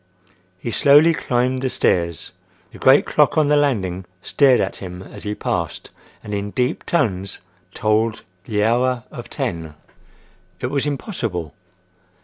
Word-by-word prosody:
He 115 +5 -5
slowly 145 +7 +6
climbed 125 -2 0
the 130 - 0
stairs. 85 - 0 0.4
The - - -13
great - - +5
clock - - +2
on 150 -2 +3
the 150 - +4
landing 95 -11 0 0.2
stared 135 -3 +4
at - - -1
him 90 -1 -8
as - - -11
he 105 0 -2
passed 85 -5 -3 0.3
and 105 - -6
in 100 0 -2
deep 125 +7 -2
tones 100 - 0 0.4
tolled 110 +1 +1 0.2
the 105 -2 0
hour—of 120 +1 -1
ten. 85 - -4 0.8
It - - -3
was 140 0 0
impossible! 115 - -4
115 Hz, 135 wpm, -21 LUFS, 95-135 Hz, 0.8 s, slowly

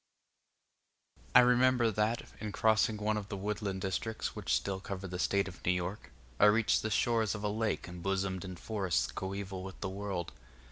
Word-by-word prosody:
I - - +11
remember 125 -1 +4
that, 105 +3 0 0.2
in 105 -1 -4
crossing 110 -1 +3
one 105 +1 0
of 100 -1 -5
the 100 - -4
woodland 100 -1 -3
districts 105 +4 -2
which 95 -6 -4
still 95 +6 -1
cover 95 0 -6
the 90 0 -5
State 100 +1 +2
of 90 - -10
New 90 - +3
York, 90 +4 -4 0.3
I - - +7
reached 110 +1 +4
the 110 - -2
shores 110 0 +2
of 105 - -6
a 105 - +1
lake 110 -2 -1
embosomed 95 +2 -2
in 95 -1 -6
forests 95 -2 -1
coeval 95 0 -4
with 95 0 -8
the 100 - -2
world. 95 -3 -4
100 Hz, 180 wpm, -32 LUFS, 95-110 Hz, 0.3 s, I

